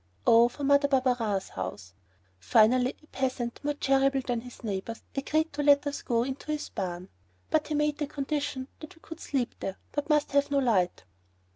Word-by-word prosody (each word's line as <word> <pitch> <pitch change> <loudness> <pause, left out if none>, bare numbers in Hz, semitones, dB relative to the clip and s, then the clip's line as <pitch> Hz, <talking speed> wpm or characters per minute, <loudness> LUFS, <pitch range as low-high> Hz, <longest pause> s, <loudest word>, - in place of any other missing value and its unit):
Oh, 235 +1 +6
for 285 +4 -8
Mother 285 +1 +4
Barberin's 250 -7 +1
house! 95 -1 -6 0.5
Finally 245 - +4
a - - -20
peasant, 255 -3 -2
more 295 0 -1
charitable 270 -1 +2
than 240 -2 -1
his 245 0 -12
neighbors, 210 +1 -4
agreed 310 +4 0
to 290 - -2
let 285 0 +5
us 285 0 -3
go 235 -2 +1
into 270 +4 -5
his 300 -1 -3
barn. 180 -2 -4 0.4
But 310 -1 +2
he 305 - -2
made 300 0 0
the 295 - -1
condition 280 -2 -3
that 310 - -10
we - - -21
could 325 0 -10
sleep 265 -7 -2
there, 195 - -4
but 290 +2 -3
must 300 -1 +2
have 280 0 +2
no 285 - +1
light. 215 -10 +1
270 Hz, 185 wpm, -28 LUFS, 230-290 Hz, 0.5 s, Oh